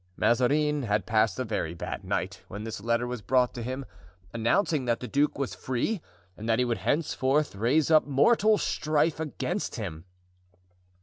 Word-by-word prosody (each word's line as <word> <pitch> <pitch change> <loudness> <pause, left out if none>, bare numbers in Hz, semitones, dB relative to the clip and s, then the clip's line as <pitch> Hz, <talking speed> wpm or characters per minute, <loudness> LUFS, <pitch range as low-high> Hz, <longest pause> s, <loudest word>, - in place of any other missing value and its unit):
Mazarin 145 +5 +2
had 105 -5 0
passed 110 0 +2
a 130 - -1
very 105 -7 -3
bad - - -5
night - - -3
when 105 +2 -7
this 110 -2 -6
letter 115 +2 +1
was 120 -2 -4
brought 125 +4 +2
to 120 - -6
him, 130 +3 -4 0.5
announcing 130 - +1
that 120 -1 +1
the 125 - -6
duke 145 +3 +1
was 140 -2 -2
free 130 - -2 0.3
and 110 +3 -6
that 115 - +3
he 125 - +2
would 115 -4 -1
henceforth 145 - +1
raise 130 +9 +2
up 155 -1 +5
mortal 210 - +4
strife 155 -2 0
against 155 -4 -3
him. 80 +2 -6
125 Hz, 170 wpm, -28 LUFS, 115-150 Hz, 0.5 s, up